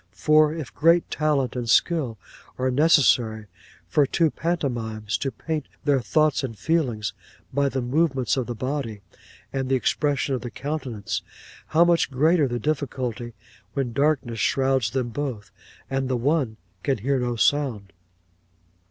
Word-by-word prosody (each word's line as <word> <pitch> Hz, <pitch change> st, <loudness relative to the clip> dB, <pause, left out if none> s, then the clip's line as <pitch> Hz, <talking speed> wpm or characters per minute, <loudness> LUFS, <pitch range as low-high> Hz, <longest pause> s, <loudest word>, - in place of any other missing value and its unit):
For 155 Hz, 0 st, +4 dB
if 155 Hz, -10 st, -6 dB
great 165 Hz, +2 st, +3 dB
talent 145 Hz, -5 st, 0 dB
and 120 Hz, -2 st, -3 dB
skill 135 Hz, -4 st, +2 dB, 0.4 s
are 130 Hz, 0 st, 0 dB
necessary 125 Hz, -7 st, +3 dB, 0.4 s
for 145 Hz, -2 st, +3 dB
two 160 Hz, +2 st, +2 dB
pantomimes 115 Hz, -10 st, -2 dB
to 135 Hz, -, -1 dB
paint 155 Hz, -1 st, -4 dB, 0.2 s
their 140 Hz, -3 st, +2 dB
thoughts 155 Hz, +3 st, +2 dB
and 115 Hz, -5 st, -4 dB
feelings 115 Hz, -, 0 dB, 0.4 s
by 140 Hz, +1 st, +2 dB
the 135 Hz, -2 st, -2 dB
movements 135 Hz, 0 st, +1 dB
of 130 Hz, -3 st, -2 dB
the 120 Hz, -, -4 dB
body, 130 Hz, -4 st, -3 dB, 0.5 s
and 135 Hz, -1 st, -2 dB
the 135 Hz, -, +3 dB
expression 140 Hz, +2 st, 0 dB
of 125 Hz, -, -2 dB
the 120 Hz, -, -5 dB
countenance, 130 Hz, -4 st, -4 dB, 0.5 s
how 165 Hz, +2 st, +4 dB
much 170 Hz, -1 st, +3 dB
greater 150 Hz, +3 st, +3 dB
the 120 Hz, -1 st, -2 dB
difficulty 125 Hz, -4 st, -3 dB, 0.4 s
when 130 Hz, -4 st, -1 dB
darkness 135 Hz, -4 st, +1 dB
shrouds 130 Hz, +1 st, +2 dB
them 130 Hz, -1 st, -2 dB
both, 120 Hz, -4 st, -4 dB, 0.4 s
and 135 Hz, -1 st, -2 dB
the 130 Hz, -, +1 dB
one 130 Hz, -3 st, 0 dB, 0.2 s
can 135 Hz, -2 st, 0 dB
hear 135 Hz, +5 st, 0 dB
no 120 Hz, -1 st, -1 dB
sound. 115 Hz, -6 st, +1 dB
135 Hz, 145 wpm, -24 LUFS, 120-150 Hz, 0.5 s, For